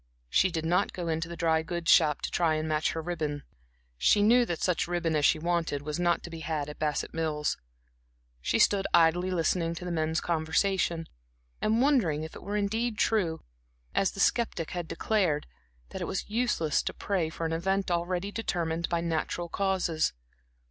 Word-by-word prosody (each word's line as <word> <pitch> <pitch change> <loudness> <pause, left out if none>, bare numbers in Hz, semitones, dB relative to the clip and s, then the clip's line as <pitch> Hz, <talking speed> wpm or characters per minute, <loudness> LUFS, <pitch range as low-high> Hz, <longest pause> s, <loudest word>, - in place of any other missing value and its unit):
She 190 - +4
did 165 -2 -3
not 175 +2 +1
go 175 -2 -4
into 165 +1 -2
the 170 - -6
dry 160 -1 +2
goods 170 +1 0
shop 150 -3 +5
to - - -3
try 160 -3 +2
to 155 - -2
match 155 0 0
her 160 - -4
ribbon; 155 -4 -3 0.6
she 205 - +4
knew 240 +3 +5
that 170 - -2
such 180 -3 +1
ribbon 170 -2 0
as 150 -1 +2
she - - +5
wanted 165 -3 -1
was 150 +3 -3
not 175 -1 +1
to 170 - -8
be 165 - -7
had 155 -2 -3
at 150 - -9
Bassett 150 -2 -1
Mills. 155 -2 -1 0.9
She - - +1
stood 195 -1 +3
idly 170 +2 +4
listening 170 -1 0
to 180 - -7
the 180 - -3
men's 160 0 0
conversation, 170 +1 0 0.5
and 225 +3 +2
wondering 195 - +2
if 160 - -8
it - - -9
were 205 +1 -3
indeed 220 +3 -1
true, 180 -8 +1 0.5
as 195 - +2
the - - -9
skeptic 195 -7 +1
had 175 -2 -4
declared, 185 -10 0 0.4
that - - -7
it - - -1
was 190 - -3
useless 210 -9 +1
to - - -4
pray 185 -6 -1
for 165 +1 -5
an 160 - -1
event 190 +3 0
already 175 +3 -1
determined 170 -6 -2
by 170 -1 0
natural 170 +1 -2
causes. 185 -4 0
170 Hz, 190 wpm, -29 LUFS, 160-190 Hz, 0.9 s, shop